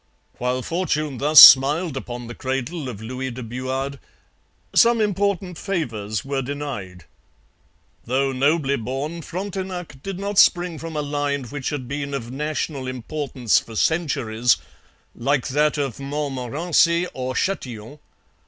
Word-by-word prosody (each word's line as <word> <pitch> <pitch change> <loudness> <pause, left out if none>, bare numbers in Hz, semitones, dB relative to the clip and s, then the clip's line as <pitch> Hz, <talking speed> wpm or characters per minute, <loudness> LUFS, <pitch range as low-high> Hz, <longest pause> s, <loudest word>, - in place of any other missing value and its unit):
While 125 +1 -1
fortune 155 -6 -2
thus 150 +2 +7
smiled 145 +4 +9
upon 120 -2 -6
the 120 - -7
cradle 135 +4 -3
of 110 -3 -8
Louis 130 +3 -4
de 125 0 -7
Buade, 130 +4 -4 0.7
some 235 -1 +5
important 200 -4 -1
favours 115 - -3
were 135 -1 -1
denied. 125 - -6 1.0
Though 135 +3 +1
nobly 140 +1 +1
born, 135 +8 -4
Frontenac 185 -4 -6
did 195 +2 -5
not 200 +1 0
spring 175 -3 +4
from 165 -1 -7
a 150 - -1
line 145 -1 -2
which 135 +2 -4
had 135 -4 -5
been 140 +1 -4
of 120 -3 -5
national 145 -1 -3
importance 130 -1 0
for 115 - -11
centuries, 125 - +1 0.6
like 135 +2 0
that 150 +3 +2
of 140 -4 -3
Montmorency 150 +5 0
or 130 0 -4
Chatillon. 130 - -3
140 Hz, 130 wpm, -22 LUFS, 125-160 Hz, 1.0 s, smiled